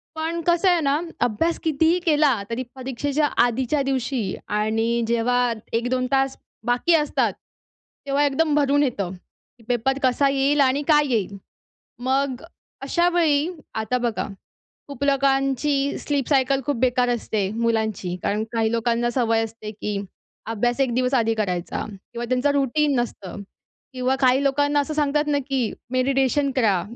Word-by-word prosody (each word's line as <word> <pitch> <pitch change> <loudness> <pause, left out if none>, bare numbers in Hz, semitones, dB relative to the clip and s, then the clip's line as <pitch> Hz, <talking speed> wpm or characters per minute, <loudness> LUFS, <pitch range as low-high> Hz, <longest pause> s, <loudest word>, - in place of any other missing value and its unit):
पण 325 +2 -2
कसं 345 +2 +4
आहे 350 -1 +3
ना 285 0 +1 0.2
अभ्यास 325 +10 +1
कितीही 320 +3 +2
केला, 295 - +3
तरी 235 +2 -2
परीक्षेच्या 270 +3 -1 0.2
आधीच्या 255 +4 0
दिवशी 260 -6 -1
आणि 225 +3 0
जेव्हा 240 +1 +1 0.2
1-2 245 +2 0
तास 270 0 +1 0.3
बाकी 245 +8 +2
असतात, 300 -2 +1 0.7
तेव्हा 280 +1 +1
एकदम 295 +2 +1
भरून 290 0 +3
येतं, 205 -9 -2
की 210 +5 -21
पेपर 245 +2 0
कसा 260 +2 +3
येईल 275 +1 +2
आणि 270 +1 +3
काय 295 -2 +4
येईल. 200 -3 -1 0.6
मग 265 +1 -1 0.4
अशावेळी 335 0 +2 0.3
आता 220 +3 -1
बघा 240 -2 -2 0.6
खूप 280 -2 -6
लोकांची 275 0 +1
स्लीप 285 -4 -1
सायकल 270 -1 +2
खूप 290 - 0
बेकार 250 0 +2
असते 215 -4 -1
मुलांची. 220 -6 -1
कारण 210 +2 0
काही 225 -1 +1
लोकांना 235 +1 +1
सवय 230 -2 +1
असते, 220 -1 -7
की 210 -1 -4 0.5
अभ्यास 240 +3 0
एक 260 -3 +1
दिवस 250 +2 0
आधी 225 -3 +2
करायचा 180 -5 -2
किंवा 215 +4 -8
त्यांचं 255 +3 +2
रुटीन 285 +1 +1
नसतं. 205 -5 -5 0.5
किंवा 255 +1 0
काही 260 0 +3
लोकांना 290 +1 +2
असं 290 +2 -2
सांगतात 295 0 +1
ना 290 -1 +2
की 260 -5 0 0.2
मेडिटेशन 270 +2 +1
करा, 210 -8 +2
260 Hz, 140 wpm, -23 LUFS, 230-285 Hz, 0.7 s, कसं